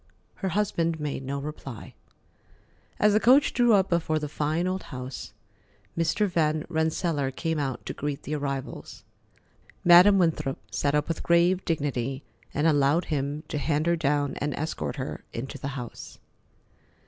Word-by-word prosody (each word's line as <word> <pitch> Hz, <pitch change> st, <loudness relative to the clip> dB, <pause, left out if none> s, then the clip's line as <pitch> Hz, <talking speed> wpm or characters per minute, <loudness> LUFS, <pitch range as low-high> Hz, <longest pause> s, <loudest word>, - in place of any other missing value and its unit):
Her 190 Hz, -, -2 dB
husband 165 Hz, -6 st, 0 dB
made 145 Hz, -2 st, -3 dB
no 140 Hz, +2 st, -3 dB
reply. 140 Hz, -4 st, -7 dB, 1.1 s
As 210 Hz, 0 st, +4 dB
the 215 Hz, -, +5 dB
coach 265 Hz, +5 st, +5 dB
drew 240 Hz, -2 st, +4 dB
up 190 Hz, -1 st, +3 dB
before 165 Hz, -2 st, +1 dB
the 150 Hz, -1 st, -3 dB
fine 155 Hz, +4 st, -1 dB
old 185 Hz, +1 st, -1 dB
house, 130 Hz, -5 st, -7 dB, 0.6 s
Mr. 165 Hz, +6 st, +1 dB
Van 155 Hz, -4 st, 0 dB
Rensselaer 160 Hz, -3 st, 0 dB
came 160 Hz, +4 st, -2 dB
out 135 Hz, -3 st, -3 dB
to -, -, -4 dB
greet 145 Hz, -1 st, -4 dB
the 150 Hz, -, -4 dB
arrivals. 140 Hz, -3 st, -5 dB, 0.8 s
Madam 180 Hz, +3 st, +8 dB
Winthrop 155 Hz, -6 st, +1 dB
sat 145 Hz, 0 st, 0 dB
up 150 Hz, 0 st, +1 dB
with 165 Hz, -, -2 dB
grave 175 Hz, +2 st, +3 dB
dignity, 135 Hz, -4 st, -2 dB, 0.3 s
and 150 Hz, -, -1 dB
allowed 150 Hz, +2 st, +3 dB
him 145 Hz, +1 st, -2 dB
to 150 Hz, -, -2 dB
hand 150 Hz, +3 st, 0 dB
her 170 Hz, 0 st, +3 dB
down 145 Hz, -3 st, 0 dB
and 145 Hz, 0 st, -2 dB
escort 155 Hz, +2 st, -3 dB
her 135 Hz, -2 st, -5 dB
into 125 Hz, +4 st, -5 dB
the -, -, -4 dB
house. 120 Hz, -3 st, -8 dB
150 Hz, 155 wpm, -27 LUFS, 140-170 Hz, 1.1 s, Madam